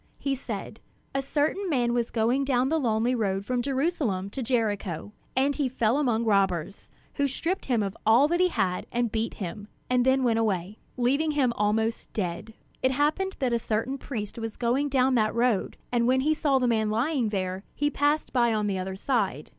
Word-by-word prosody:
He 275 - -1
said: 225 -4 -6 0.3
"A 275 - 0
certain 305 +8 -1
man 245 -5 +1
was 240 -1 0
going 240 +4 +1
down 260 -1 +1
the 320 +1 +1
lonely 235 -1 +1
road 200 -4 -1
from 250 +2 0
Jerusalem 260 - -1
to 270 - -4
Jericho; 210 -7 -1 0.3
and 275 +2 +2
he 280 -4 0
fell 240 +1 +1
among 235 -5 +1
robbers, 195 -3 0 0.3
who 285 -1 +2
stripped 335 +8 -2
him 240 -5 +1
of 195 -1 -4
all 235 +6 +5
that 345 +1 +1
he 365 - +5
had 185 - -1
and 240 -2 0
beat 225 0 -2
him; 200 +2 -6 0.2
and 250 -1 +4
then 260 +1 +3
went 230 -2 +2
away, 200 -2 -1 0.2
leaving 275 +6 +2
him 260 -5 +2
almost 220 +2 0
dead. 205 +3 -4 0.3
It 260 - +3
happened 305 +8 0
that 255 -3 0
a 235 - +2
certain 230 +5 -2
priest 220 -5 -5
was 225 -1 -5
going 255 +4 +1
down 265 -1 +3
that 215 -3 +2
road; 235 -4 +1
and 240 -1 +2
when 260 +1 +3
he 305 +3 +2
saw 295 -3 +2
the 255 - +1
man 220 -2 +1
lying 240 +2 0
there, 190 -2 -3
he 290 0 0
passed 290 +2 0
by 235 -3 +3
on 210 -1 0
the 195 -2 -1
other 190 +1 -4
side. 195 - -1
240 Hz, 200 wpm, -27 LUFS, 215-270 Hz, 0.3 s, all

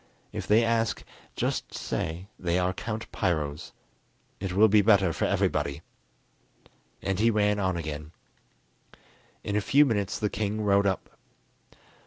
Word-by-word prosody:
If - - -5
they 110 +3 +5
ask, 115 -1 0 0.3
just - - -2
say 85 +4 -3
they 85 -1 0
are 90 0 +1
Count 110 +3 -5
Piro's; 75 -6 -2 0.7
it 95 -1 -3
will 105 +4 +5
be 105 0 +5
better 100 -4 +4
for - - -1
everybody." 70 +3 0 1.2
And 95 -1 -1
he 115 +2 +4
ran 105 -2 +2
on 95 -3 0
again. 75 -1 -5 1.3
In 100 - -2
a 105 - +2
few 145 +8 +5
minutes 105 -5 -1
the 105 - 0
king 105 +1 -2
rode 100 -1 +3
up. 95 - -3
100 Hz, 140 wpm, -27 LUFS, 90-110 Hz, 1.3 s, they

